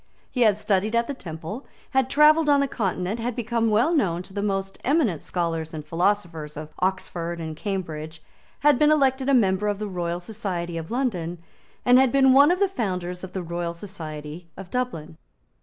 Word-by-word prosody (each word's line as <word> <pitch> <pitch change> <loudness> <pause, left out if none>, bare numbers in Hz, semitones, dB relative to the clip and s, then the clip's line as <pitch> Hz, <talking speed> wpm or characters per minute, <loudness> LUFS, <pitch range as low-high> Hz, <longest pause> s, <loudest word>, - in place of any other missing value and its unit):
He 250 - -2
had 215 -4 +5
studied 210 +1 0
at 235 0 +3
the 285 - -4
Temple, 170 - -7 0.2
had 265 -1 +2
travelled 300 +2 +5
on 285 -1 +5
the 280 - +2
Continent, 195 -2 -2
had 235 0 -2
become 230 -1 0
well 230 +10 +3
known 180 - +1
to 190 - -14
the 200 - -2
most 195 -1 -2
eminent 255 - +2
scholars 165 -2 -2
and 150 -1 -6
philosophers 165 -3 -1
of 155 0 -8
Oxford 175 -2 -2
and 160 -1 -5
Cambridge, 160 -4 -4 0.4
had 290 -3 +4
been 300 - +5
elected 270 -2 +2
a 275 - +5
member 200 -3 +2
of 205 -1 0
the 210 - -4
Royal 175 -2 -3
Society 180 -4 -4
of 165 -1 -5
London, 190 -10 -2 0.5
and 245 +1 +7
had 265 -2 +4
been 265 -1 +5
one 280 +3 +7
of 355 - +3
the 400 - +4
founders 180 - -3
of 190 0 -8
the 185 - -3
Royal 170 0 -3
Society 160 -3 -8
of 190 -2 -9
Dublin. 195 -12 -3
195 Hz, 190 wpm, -24 LUFS, 170-250 Hz, 0.5 s, and